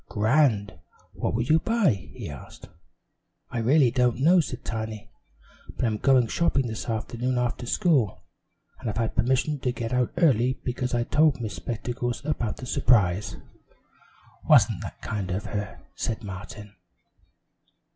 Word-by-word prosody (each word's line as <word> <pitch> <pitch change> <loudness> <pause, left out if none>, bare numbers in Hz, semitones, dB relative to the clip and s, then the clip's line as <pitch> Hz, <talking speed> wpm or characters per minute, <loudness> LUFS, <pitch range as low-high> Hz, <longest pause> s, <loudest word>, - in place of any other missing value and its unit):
"Grand. 110 - +2 0.3
What - - -2
will 115 - +1
you 155 +6 +3
buy?" 180 - +1
he - - -8
asked. 70 -3 -10 0.8
"I 120 - -2
really 130 +2 +4
don't 125 -1 +1
know," 170 +7 +5
said 135 -6 -3
Tiny, 110 -1 -5 0.7
"but - - 0
I'm 110 -2 -1
going 130 -3 +4
shopping 135 +2 +1
this 110 0 -5
afternoon 120 +3 -2
after 120 0 -2
school. 140 - +1 0.6
I've 110 -2 -4
had 115 -1 -1
permission 130 +5 +1
to 125 -1 -1
get 115 0 -4
out 125 -1 +1
early, 130 -6 +3
because 125 0 -2
I 120 - +1
told 150 +2 +3
Miss 110 -4 -4
Spectacles 120 +7 -4
about 130 -8 -2
the 125 - -7
surprise." 105 -6 +2 1.1
"Wasn't - - +5
that - - -8
kind 100 -3 -3
of 95 +2 -3
her!" 100 -1 -5
said 115 0 -3
Martin. 105 +1 -8
120 Hz, 145 wpm, -26 LUFS, 110-130 Hz, 1.1 s, know